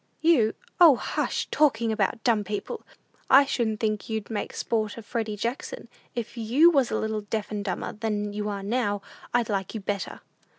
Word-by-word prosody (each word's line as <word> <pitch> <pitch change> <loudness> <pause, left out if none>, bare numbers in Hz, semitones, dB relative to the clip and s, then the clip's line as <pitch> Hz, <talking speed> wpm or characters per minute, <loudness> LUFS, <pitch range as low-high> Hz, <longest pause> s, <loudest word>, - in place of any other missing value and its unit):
You 290 -10 +4
" 470 - -21
"O, 320 -6 +9
hush - - -2
talking 235 -7 +3
about 220 +2 0
dumb 225 -4 +3
people! 210 - -4 0.5
I 275 +1 +8
shouldn't 225 -5 -1
think 215 -1 -1
you'd 220 0 -3
make 210 - -3
sport 215 -2 -1
of 230 - -9
Freddy 225 -2 -3
Jackson! 250 - -4 0.3
If 235 0 -5
you 255 +10 +5
was 275 -6 +3
a - - 0
little 220 -1 -2
deaf 210 +1 -4
and 205 -1 -2
dumber 185 -3 -3
than 210 -1 -2
you 210 0 -2
are 200 -1 -4
now, 205 -2 0 0.3
I'd 240 -2 +2
like 195 0 -2
you - - -2
better! 200 -1 -4
220 Hz, 185 wpm, -26 LUFS, 210-240 Hz, 0.5 s, O